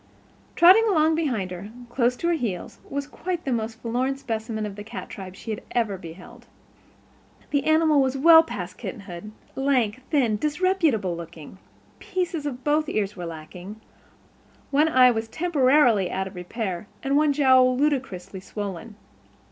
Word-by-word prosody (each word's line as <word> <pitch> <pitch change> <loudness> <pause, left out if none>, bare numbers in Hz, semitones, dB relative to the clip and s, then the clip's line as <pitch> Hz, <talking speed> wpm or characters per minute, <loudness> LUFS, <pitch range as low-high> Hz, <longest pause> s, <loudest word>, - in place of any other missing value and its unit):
Trotting 375 +6 +7
along 320 -5 +3
behind 250 - -1
her, 180 +3 -7 0.2
close 245 0 +1
to 335 - -3
her - - +3
heels, 230 - -4
was 280 0 -3
quite 345 +4 -5
the 270 - -1
most 225 -1 -2
forlorn 250 +4 -1
specimen 220 -4 -4
of 205 -2 -6
the 205 - -8
cat 225 +3 -8
tribe 190 -5 -8
she 225 - -7
had 215 - -4
ever 225 -5 0
beheld. 175 0 -12 1.0
The 285 -1 +1
animal 315 -2 +4
was 265 0 0
well 325 +3 +8
past 325 - -7
kitten 220 - -6
hood, 185 +2 -9 0.2
lank, 255 -4 +1
thin, 245 -8 +2
disreputable 295 - +1
looking. 170 +1 -10 0.4
Pieces 350 -5 -3
of 255 -2 -6
both 300 +1 +1
ears 205 -1 -1
were 175 -3 -6
lacking, 175 +6 -9 0.9
one 295 +3 +4
eye 255 -4 +6
was 225 -1 -3
temporarily 260 - +3
out 190 +1 -2
of 190 - -8
repair, 185 +1 -5 0.2
and 275 +1 0
one 300 0 +4
jowl 260 -3 +4
ludicrously 255 -11 -1
swollen. 200 +1 -7
245 Hz, 155 wpm, -24 LUFS, 200-295 Hz, 1.0 s, well